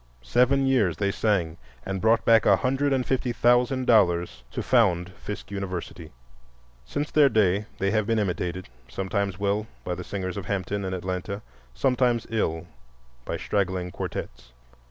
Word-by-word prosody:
Seven 130 - +3
years 110 - +2
they 100 -1 0
sang, 95 -7 0 0.3
and 95 -1 -3
brought 115 +1 +3
back 115 -1 +5
a 100 - +7
hundred 135 +6 0
and 130 -2 +1
fifty 130 -1 0
thousand 125 +2 +2
dollars 85 - +3
to - - -4
found 95 -8 +2
Fisk 105 +1 -8
University. 90 -4 -5 0.7
Since 145 - -4
their 145 -2 +5
day 105 -2 +2
they 100 0 0
have 110 -1 +1
been 115 - +1
imitated—sometimes 95 - -3
well, 100 +2 -1 0.2
by 90 - -3
the 90 +1 -5
singers 95 0 -4
of 95 -3 -6
Hampton 100 +1 -2
and 95 0 -2
Atlanta, 95 +3 -4 0.3
sometimes 125 - +1
ill, 80 -7 -1 0.6
by - - -3
straggling 95 -3 -1
quartettes. - - -6
100 Hz, 150 wpm, -26 LUFS, 90-115 Hz, 0.7 s, a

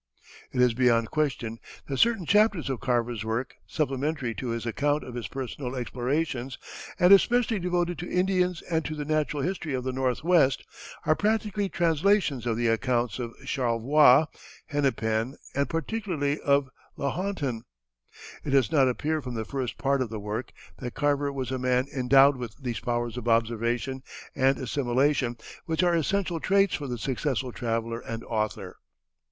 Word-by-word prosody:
It 130 - -3
is 125 -2 +4
beyond 115 -2 +2
question 125 -7 -1 0.3
that 135 - -3
certain 230 -6 +3
chapters 205 -6 +3
of 130 - -3
Carver's 120 -4 0
work, 115 +4 -3
supplementary 140 -3 -1
to 115 +4 -5
his 115 0 -3
account 145 +5 0
of 125 - -8
his 120 -3 -4
personal 130 -1 -5
explorations, 130 +1 -2 0.4
and 180 +2 +7
especially 230 +1 +4
devoted 175 -1 -1
to 175 - -5
Indians 180 -2 +1
and 160 -2 -1
to 155 - -3
the 150 -1 -4
natural 150 -2 0
history 175 -6 -2
of 125 - -3
the 130 0 -2
Northwest, 135 +3 +2 0.4
are 155 - +4
practically 210 -1 0
translations 165 - +2
of 115 -1 0
the 120 - 0
accounts 120 0 +1
of 120 -2 -5
Charlevoix, 130 +3 +4 0.4
Hennepin, 130 -5 0 0.2
and 140 0 0
particularly 165 -4 -2
of 140 -2 +2 0.3
Lahontan. 140 - -2 0.8
It - - -4
does 135 0 +3
not 135 -5 +4
appear 155 +5 -1
from 125 -3 -6
the 110 -1 -3
first 130 -2 -4
part 140 -1 +1
of 125 - -1
the 110 -1 -5
work 105 +4 -4 0.3
that 125 -2 -6
Carver 145 -1 +1
was 130 -3 -4
a 130 - -2
man 125 0 +2
endowed 135 +2 +5
with 120 -3 -6
those 120 -5 -4
powers 120 -1 -2
of 120 -1 -5
observation 115 +3 0 0.3
and 135 0 +3
assimilation 130 -1 0 0.3
which 160 +2 +1
are 175 -1 +3
essential 175 +1 0
traits 195 +2 +3
for 145 - -3
the 125 -1 -3
successful 130 +1 -2
traveller 115 -1 -2
and 115 -1 -6
author. 110 -2 -3
135 Hz, 160 wpm, -27 LUFS, 120-155 Hz, 0.8 s, and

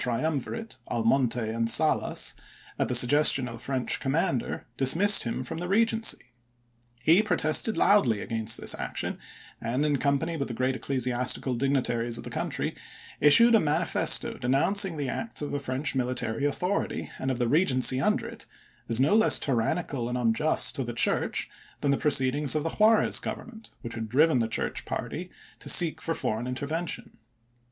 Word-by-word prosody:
triumvirate, 155 - -3
Almonte 120 +1 +1
and 115 +1 -1
Salas, 155 +5 0 0.5
at - - 0
the 125 - 0
suggestion 135 +1 +5
of 120 - -8
the 115 - -10
French 130 0 -2
commander, 135 -3 -2
dismissed 170 +11 +5
him 120 +2 -4
from 130 - -6
the 180 - -5
Regency. 225 - -1 0.7
He 170 +6 +5
protested 180 +1 0
loudly 125 - +3
against 110 +1 -2
this - - +1
action, - - -5 0.4
and, 125 +6 -1
in 145 -2 +1
company 140 +4 -1
with 140 - -3
the 120 - -6
great 130 +2 -1
ecclesiastical 125 -1 -2
digni 135 +1 0
taries 120 0 -2
of - - -9
the - - -8
country, - - -3 0.5
issued 230 +12 +6
a 225 - +6
manifesto 160 +1 +1
denouncing 165 +8 +1
the 145 -2 -3
acts 225 - -4
of 145 - -5
the 145 - -2
French 135 +1 -2
military 125 -1 -2
authority, 180 +7 -3
and 130 - -3
of 130 - -2
the 120 - -1
Eegency 130 -2 +3
under - - 0
it, - - -11 0.4
as 115 0 +1
no 140 +8 +2
less 220 +1 +5
tyrannical 130 0 -2
and 125 - -3
unjust 120 +6 +3
to 135 - -2
the 120 -1 -6
Church - - 0 0.3
than 140 - +1
the - - +2
proceedings 145 0 +2
of 155 - -1
the 165 - -3
Juarez 220 +1 +2
Government, 225 -2 -8
which 115 -2 -7
had 110 -1 -6
driven 150 +3 +3
the 115 - 0
Church 115 - -3
party - - -6 0.3
to - - -6
seek 160 -2 +5
for 165 0 -2
foreign 110 +3 -3
intervention. 150 +7 -5
135 Hz, 170 wpm, -26 LUFS, 125-160 Hz, 0.7 s, issued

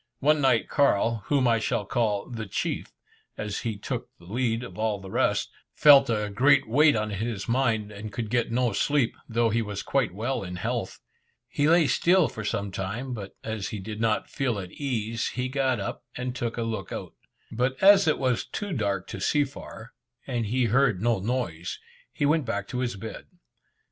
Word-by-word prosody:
One 150 +1 +3
night 130 -4 +3
Carl 115 -5 +2
whom 140 -3 +3
I 115 -1 +3
shall 105 -1 -1
call 105 -2 0
"the 115 -4 -6
chief," - - -2 0.5
as 105 -1 -3
he 110 -3 -3
took 100 - -4
the 85 - -17
lead 115 +3 -1
of 125 - -9
all 110 -2 0
the 95 -1 -10
rest - - +1 0.2
felt 140 -3 +7
a 105 -2 0
great 130 +5 +4
weight 145 +6 +5
on 110 -1 -1
his 105 0 -3
mind, 115 -4 +1
and 105 +1 -7
could 110 0 -4
get 120 -2 +1
no 120 -2 +1
sleep, 140 +2 +1
though 115 0 +2
he 115 +2 +1
was 105 -2 -4
quite 135 -7 +1
well 120 +6 -2
in 90 -1 -6
health. 90 - -3 0.5
He 145 +1 +1
lay 170 -1 +5
still 175 +4 +4
for 110 - -7
some 100 -1 -2
time, 105 +8 -4
but 100 -4 -7
as 110 -3 -3
he, 105 - -5
did 105 +2 -6
not 110 -2 +1
feel 125 -5 -1
at 95 -2 -6
case, 115 -5 -2
he 125 +1 -2
got 130 -3 +1
up, 100 - -5
and 125 0 -3
took 120 -2 -3
a 115 - -1
look 115 -1 -4
out. - - -6 0.4
But 125 +3 0
as 195 -1 +7
it 155 - +3
was 130 -3 0
too 205 -3 -5
dark 100 - -1
to - - -6
see 150 -1 +3
far, 130 -4 -9 0.3
and 120 -4 -2
he 125 +3 +1
heard 120 -3 +3
no 115 0 +1
noise, 95 -6 -3 0.3
he 145 - -1
went 150 0 +2
back 100 -3 -2
to 125 - -3
his 125 -4 -1
bed. 110 +3 -8
115 Hz, 200 wpm, -26 LUFS, 105-130 Hz, 0.5 s, felt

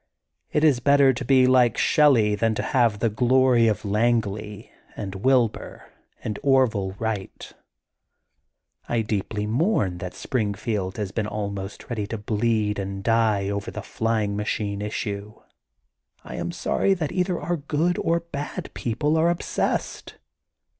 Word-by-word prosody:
It 150 - +1
is 145 -6 +4
better 140 +1 +5
to 130 - -5
be 130 0 +4
like 125 -3 +4
Shelley 125 -9 +4
than 110 +1 +1
to - - -2
have 120 -6 +2
the 115 - +1
glory 125 +1 +4
of 105 -1 -1
Langley 105 -1 -1 0.2
and 95 -3 -5
Wilbur 120 +3 0 0.3
and 105 -2 -4
Orville 125 -9 +2
Wright. 110 -3 -5 1.4
I 115 -1 +1
deeply 105 0 -2
mourn 110 - 0
that 90 0 -6
Springfield 105 -4 -2
has 105 -3 -3
been 105 -1 -2
almost 100 -2 -5
ready 110 -4 -3
to 115 - -4
bleed 105 0 0
and 95 0 -5
die 110 -3 +2
over 100 0 -3
the - - -7
flying 110 -3 -1
machine 105 -1 -2
issue. 105 0 -4 0.9
I - - -9
am - - -3
sorry 195 - +1
that 160 -5 -3
either 180 -1 0
our 175 0 -2
good 155 +4 0
or 165 - +1
our - - +1
bad 145 -4 -6
people 145 +7 -1
are 165 +2 +3
obsessed. 175 0 -2
110 Hz, 145 wpm, -24 LUFS, 105-130 Hz, 1.4 s, better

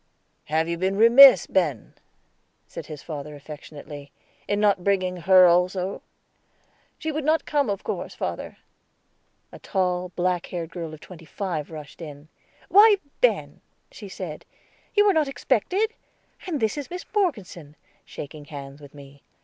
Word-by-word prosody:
"Have 160 +2 0
you 170 0 -3
been 190 +2 0
remiss, 245 +5 +8
Ben," 155 - -1 0.7
said - - -9
his 150 -2 -9
father 150 -2 -7
affectionately, 145 0 -11 0.4
"in 205 - 0
not 205 -3 +2
bringing 185 -2 0
her 185 +2 +6
also?" 180 +2 +1 1.0
"She 315 - -3
would 310 0 -3
not 315 +3 +1
come, 285 -5 0
of 200 -1 -3
course, - - -5
father." - - -5 0.9
A - - -12
tall, 180 -1 -1
black 180 -1 -1
haired 170 -2 -5
girl 165 -3 -6
of 155 - -19
twenty 170 -3 -13
five 160 -2 -4
rushed 155 0 -10
in. 150 -1 -10 0.4
"Why, 415 +1 +7 0.2
Ben," - - +1 0.3
she 205 -4 -10
said, 175 -5 -7 0.5
"you 415 0 +5
were 405 - +5
not 310 -3 +2
expected. 275 - 0 0.5
And 320 -6 -2
this 220 +5 0
is 285 - -7
Miss 360 +1 -7
Morgeson," 200 - -2 0.3
shaking 145 +1 -9
hands 140 -1 -10
with 145 0 -14
me. 140 0 -14
180 Hz, 150 wpm, -24 LUFS, 155-235 Hz, 1.0 s, remiss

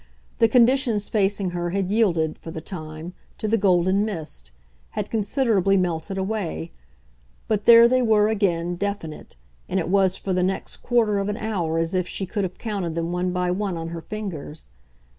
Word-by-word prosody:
The 230 - +6
conditions 240 -2 +3
facing 200 -3 0
her 175 0 -2
had 195 +1 -1
yielded, 170 -8 +1
for - - -9
the 160 - -5
time, 160 0 -7 0.2
to 215 - -3
the 220 - +3
golden 190 -1 +3
mist 155 - -5 0.5
had - - -3
considerably 210 -3 +2
melted 180 +1 -1
away; 190 - -3 0.8
but 210 -2 0
there 235 0 +9
they 255 +1 +3
were 215 -3 +4
again, 175 -5 0
definite, 200 -5 -5 0.3
and 190 - +1
it 170 - -2
was 190 -1 +3
for 190 - -3
the 180 - +1
next 190 +1 -2
quarter 225 -4 +1
of 200 +1 -1
an 210 - -2
hour 180 -8 -2
as 165 +1 -1
if 185 -1 0
she 195 - -3
could 205 +2 -2
have 185 -1 -4
counted 195 -7 -3
them 170 0 -2
one 180 +1 -1
by 180 0 0
one 190 -1 -2
on 165 0 -5
her 165 0 -6
fingers. 165 - -7
190 Hz, 180 wpm, -23 LUFS, 170-210 Hz, 0.8 s, there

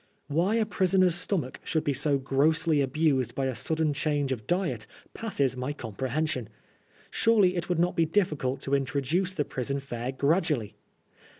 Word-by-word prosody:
Why 175 +9 +2
a 225 -1 +2
prisoner's 185 -3 +3
stomach 175 -6 0
should 160 -3 -1
be 145 -3 0
so 140 +1 +2
grossly 150 +3 +2
abused 135 -3 +1
by 135 - -1
a 130 -2 -1
sudden 160 +1 0
change 145 -2 0
of 115 -5 -4
diet 170 - -1 0.3
passes 140 - -1
my 130 +3 -3
comprehension. 130 +2 -3 0.6
Surely 205 -5 +3
it 175 0 -3
would 175 - +1
not 175 +2 +1
be 165 -3 +2
difficult 150 -8 0
to 140 - -3
introduce 145 +7 0
the 145 - 0
prison 135 +2 -3
fare 125 -2 -4
gradually. 140 - 0
150 Hz, 160 wpm, -28 LUFS, 135-175 Hz, 0.6 s, prisoner's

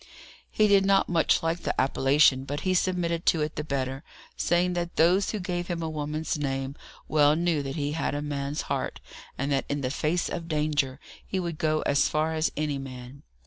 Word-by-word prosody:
He 215 - +3
did 200 -1 +5
not 195 0 +3
much 170 0 +2
like 165 +1 0
the - - -2
appellation, 135 0 +4
but 145 +2 -4
he 185 - +1
submitted 175 -2 0
to 160 - +4
it 150 - -4
the 150 - -3
better, 135 -1 -3 0.3
saying 175 +1 +1
that 175 0 -3
those 180 +5 +4
who 215 - -2
gave 175 -1 -3
him 170 -2 -3
a 160 - -2
woman's 155 +1 -3
name 135 -1 -2 0.3
well 150 -1 +4
knew 170 -2 +1
that 135 0 -5
he 145 -1 -1
had 150 -1 -1
a 145 - -2
man's 145 0 -3
heart, - - -3 0.4
and 140 +2 -2
that 135 -1 +1
in 145 0 -1
the 130 -1 -1
face 155 +4 0
of 165 -1 -5
danger 150 -4 0 0.2
he 190 - -3
would 170 -3 -4
go 155 0 +1
as 140 - +2
far 155 +1 0
as 155 0 0
any 150 -2 -1
man. 130 0 -9
155 Hz, 205 wpm, -27 LUFS, 140-170 Hz, 0.4 s, did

